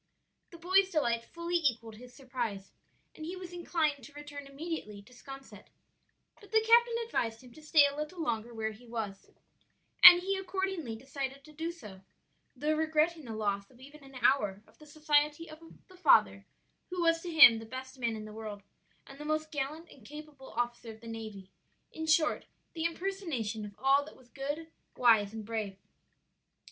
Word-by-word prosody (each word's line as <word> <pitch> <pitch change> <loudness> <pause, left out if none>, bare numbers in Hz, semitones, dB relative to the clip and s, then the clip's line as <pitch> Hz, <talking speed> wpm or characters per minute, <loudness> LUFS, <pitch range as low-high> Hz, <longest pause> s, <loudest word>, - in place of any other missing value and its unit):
The 340 - -12
boy's 375 +3 +3
delight 235 -9 0
fully 340 +1 -2
equalled 235 -8 -1
his 245 +2 -13
surprise, 240 -7 -5 0.4
and 310 - -10
he 345 +4 -5
was 365 -1 -9
inclined 320 -5 -1
to 285 - -13
return 290 -1 -9
immediately 275 -8 -6
to 245 +5 -19
'Sconset; 270 +2 -12 0.7
but 410 - -17
the 440 0 +3
captain 470 0 +6
advised 230 - -2
him 250 - -14
to 310 - -14
stay 305 -1 +5
a 280 0 -1
little 305 +4 -5
longer 240 -7 -2
where 220 -1 -3
he 230 +3 -15
was; 215 -4 -6 0.7
and 355 -1 +13
he 390 +2 -1
accordingly 380 - -3
decided 270 +2 -6
to 305 - -15
do 325 +3 -3
so; 210 - -12 0.5
though 300 +4 0
regretting 315 0 +1
the 225 -2 -6
loss 200 -2 -2
of 250 - -21
even 285 +3 -14
an 270 -1 -15
hour 205 -6 +2
of - - -25
the 305 - -15
society 300 +1 +1
of 310 0 -11 0.3
the 370 - -17
father 365 - +4 0.4
who 360 -1 -3
was 330 0 +3
to 355 - -6
him 290 -9 +8
the 225 - -9
best 260 +2 -8
man 230 -2 -1
in 215 -1 -7
the 215 - -10
world 210 -2 -7 0.4
and 275 +1 -13
the - - -6
most 310 +1 -2
gallant 300 +3 -4
and 260 - -17
capable 295 +1 -11
officer 240 0 -3
of 220 0 -14
the 230 - -11
navy; 215 -4 -8 0.4
in 320 0 -6
short, 310 0 +2 0.3
the 325 -1 -3
impersonation 330 - -3
of 205 -1 -10
all 275 +2 +3
that 305 - -13
was 250 -2 -21
good, 290 +5 -5 0.2
wise, 220 -5 +4
and 220 -1 -7
brave. 215 -3 -4
280 Hz, 185 wpm, -31 LUFS, 230-320 Hz, 0.7 s, and